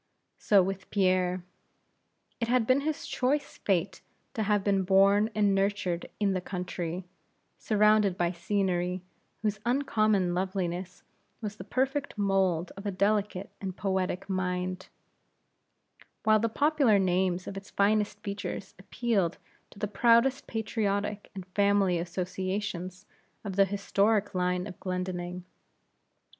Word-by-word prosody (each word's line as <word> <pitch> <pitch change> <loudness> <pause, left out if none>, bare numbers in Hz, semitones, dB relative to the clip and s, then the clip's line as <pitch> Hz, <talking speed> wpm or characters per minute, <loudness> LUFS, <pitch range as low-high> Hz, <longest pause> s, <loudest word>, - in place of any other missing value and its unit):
So 200 -3 +5
with 195 +1 -4
Pierre. 185 -2 +1 1.0
It 230 - -1
had 245 -1 +3
been 255 +4 +3
his 310 +1 -2
choice 275 +4 -1
fate 185 -1 0 0.3
to 220 - -2
have 205 -1 +2
been 195 -1 +2
born 195 +3 +4
and 205 -2 +3
nurtured 195 -3 0
in 200 -2 +2
the 185 - -1
country, 180 -1 -4 0.5
surrounded 210 -3 +3
by 175 0 +1
scenery 180 0 -1 0.4
whose 210 -1 0
uncommon 215 -7 +2
loveliness 180 -1 -3 0.4
was 210 -2 -5
the - - -7
perfect 270 0 -1
mould 190 -4 +1
of 195 +1 -6
a - - +1
delicate 200 0 0
and 190 -2 -5
poetic 190 -1 -1
mind; 185 -1 -2 1.4
while 215 0 +5
the 230 +2 +1
popular 285 -4 +3
names 185 -1 +1
of 195 - -6
its 195 0 -8
finest 205 0 +1
features 200 -1 -5
appealed 195 -3 0 0.3
to - - -18
the 210 - -2
proudest 235 +6 +3
patriotic 210 -2 -2
and 190 -2 -6
family 200 -2 +2
associations 185 +1 -4 0.4
of 195 -3 -5
the 195 0 +5
historic 200 +1 +1
line 180 0 0
of 185 - -9
Glendinning. 180 -1 -4
195 Hz, 125 wpm, -29 LUFS, 185-210 Hz, 1.4 s, So